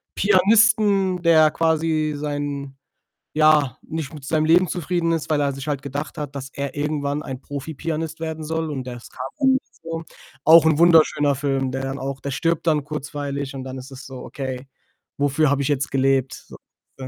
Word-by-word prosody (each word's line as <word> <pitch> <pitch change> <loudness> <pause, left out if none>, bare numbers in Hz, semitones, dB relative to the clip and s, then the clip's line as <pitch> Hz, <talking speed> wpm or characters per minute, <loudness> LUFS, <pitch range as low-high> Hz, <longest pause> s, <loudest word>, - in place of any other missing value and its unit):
Pianisten, 200 -2 +4
der 155 -2 +5
quasi 160 -1 +1
sein 145 -2 -4 0.6
ja, 150 -4 +4
nicht 160 -1 -5
mit 145 -3 -10
seinem 155 +2 +1
Leben 175 +3 +5
zufrieden 175 0 -1
ist, 165 -1 -2
weil 150 -2 +2
er 140 -1 +1
sich 135 +1 -7
halt 140 -2 -1
gedacht 140 +2 -5
hat, 145 -2 -5
dass 135 0 -7
er 140 -1 -4
irgendwann 145 0 -2
ein 130 -2 -7
Profipianist 160 +3 -5
werden 160 -1 -4
soll 160 0 -2
und 130 -3 -5
ja 125 - -5
es 120 -1 -11
kam - - -19 0.2
halt 265 -2 +4
nicht 265 - -2
so. 165 0 -5 0.4
Auch 160 0 +8
'n 155 -2 +4
wunderschöner 155 -4 +5
Film, 135 -1 -1
der 135 +1 -3
dann 135 0 -4
auch 135 0 -4
der 140 - -4
stirbt 165 +6 -1
dann 150 -3 +2
kurzweilig 145 -2 -4
und 135 -1 -6
dann 130 0 -6
ist 130 +2 -10
es 135 +1 -10
so: 130 -1 -9
„Okay, 130 -1 -6 0.5
wofür 145 +1 +2
habe 140 0 +1
ich 135 - -1
jetzt 145 -1 -1
gelebt?“, 135 -1 0
so. - - -12 0.4
Ja. 130 - -6
145 Hz, 195 wpm, -22 LUFS, 135-160 Hz, 0.6 s, Auch